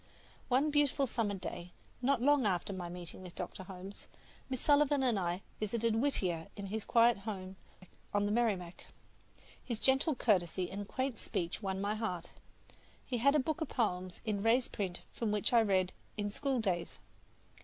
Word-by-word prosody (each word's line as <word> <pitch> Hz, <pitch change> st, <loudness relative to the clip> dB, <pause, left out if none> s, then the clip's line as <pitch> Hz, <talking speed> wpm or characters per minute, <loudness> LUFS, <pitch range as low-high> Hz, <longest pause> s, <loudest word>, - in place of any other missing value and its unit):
One 270 Hz, +4 st, +3 dB
beautiful 290 Hz, -1 st, +3 dB
summer 225 Hz, -5 st, -1 dB
day, 180 Hz, -1 st, -6 dB, 0.3 s
not 260 Hz, -1 st, +2 dB
long 285 Hz, -4 st, +5 dB
after 185 Hz, +1 st, 0 dB
my 180 Hz, -2 st, -4 dB
meeting 175 Hz, +1 st, -8 dB
with 180 Hz, -2 st, -10 dB
Dr. 180 Hz, +1 st, -5 dB
Holmes, 190 Hz, +1 st, -9 dB, 0.4 s
Miss 260 Hz, -2 st, -2 dB
Sullivan 290 Hz, -1 st, +4 dB
and 240 Hz, -6 st, +3 dB
I 175 Hz, +1 st, -1 dB, 0.2 s
visited 225 Hz, +1 st, 0 dB
Whittier 185 Hz, -11 st, 0 dB
in 200 Hz, -, -5 dB
his 210 Hz, +2 st, -4 dB
quiet 235 Hz, -2 st, +5 dB
home 195 Hz, -2 st, -5 dB, 0.6 s
on 205 Hz, 0 st, +2 dB
the 205 Hz, -, 0 dB
Merrimac. 205 Hz, -7 st, 0 dB, 0.8 s
His 235 Hz, -, -3 dB
gentle 270 Hz, +5 st, +3 dB
courtesy 185 Hz, -6 st, +1 dB
and 200 Hz, +1 st, -5 dB
quaint 260 Hz, -1 st, -2 dB
speech 175 Hz, +3 st, -3 dB
won 190 Hz, -2 st, -2 dB
my 200 Hz, +2 st, 0 dB
heart. 200 Hz, -6 st, -3 dB, 0.7 s
He 245 Hz, -2 st, -2 dB
had 280 Hz, +5 st, +5 dB
a -, -, +5 dB
book 315 Hz, +4 st, -1 dB
of 315 Hz, -, 0 dB
his -, -, -12 dB
poems 185 Hz, -6 st, -1 dB
in 210 Hz, -3 st, 0 dB
raised 235 Hz, +4 st, +3 dB
print 185 Hz, -4 st, -3 dB
from 225 Hz, -3 st, -1 dB
which 210 Hz, +3 st, 0 dB
I 235 Hz, -, +7 dB
read 190 Hz, -4 st, +2 dB, 0.2 s
"In 205 Hz, -1 st, -1 dB
School 270 Hz, +3 st, 0 dB
Days." 180 Hz, -6 st, -1 dB
210 Hz, 175 wpm, -34 LUFS, 185-250 Hz, 0.8 s, I